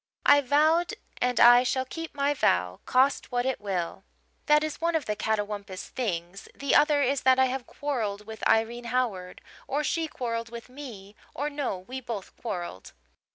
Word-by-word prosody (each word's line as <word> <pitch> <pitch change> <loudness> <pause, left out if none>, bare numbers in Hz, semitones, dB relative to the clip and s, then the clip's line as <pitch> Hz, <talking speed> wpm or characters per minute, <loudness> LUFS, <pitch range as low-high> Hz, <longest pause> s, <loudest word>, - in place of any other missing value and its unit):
I 285 - +7
vowed 310 +6 +3 0.3
and 250 0 +1
I 245 +1 +9
shall 260 +1 0
keep 325 +3 -7
my 285 +1 +1
vow, 90 - +1
cost 265 +2 +2
what 245 0 0
it 265 -4 -1
will. 185 -4 -3 0.4
"That 300 0 +5
is 310 0 -4
one 335 0 +1
of 320 - 0
the 210 - -1
'catawampus' 205 -3 -3
things. 185 -5 -4
The 280 - -1
other 295 -1 +5
is 275 +1 +1
that 260 0 +5
I 260 - +5
have 255 -1 -3
quarrelled 220 -8 -3
with 220 0 -9
Irene 235 +2 +1
Howard 230 -7 -2 0.3
or 290 +2 -1
she 325 +2 0
quarrelled 230 -5 -4
with 235 +1 -9
me 230 -7 -10 0.2
or, 295 +2 -2
no, 285 -9 -2
we 250 +9 -7
both 230 -6 -6
quarrelled. 175 - -6
245 Hz, 175 wpm, -27 LUFS, 210-285 Hz, 0.4 s, I